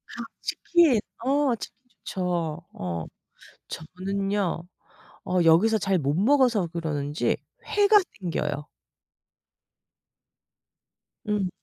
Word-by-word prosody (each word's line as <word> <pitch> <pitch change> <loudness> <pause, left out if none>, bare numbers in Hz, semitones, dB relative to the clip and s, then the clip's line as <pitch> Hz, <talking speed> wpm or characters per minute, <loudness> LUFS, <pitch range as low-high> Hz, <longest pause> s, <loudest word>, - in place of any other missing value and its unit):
아 - - -5 0.2
치킨. 330 -9 +3 0.3
어 275 -1 +3
치킨 215 - -9 0.3
좋죠. 175 -3 -2
어. 85 -3 -4 0.6
저는요. 195 +1 -2 0.6
어 185 - 0
여기서 195 +8 +5
잘 195 -1 +1
못 140 -2 0
먹어서 235 - +3
그러는지 150 -3 -1 0.3
회가 415 +1 +5 0.2
땡겨요. 150 -5 -2 2.6
음. 205 -3 0
185 Hz, 160 characters per minute, -26 LUFS, 160-220 Hz, 2.6 s, 여기서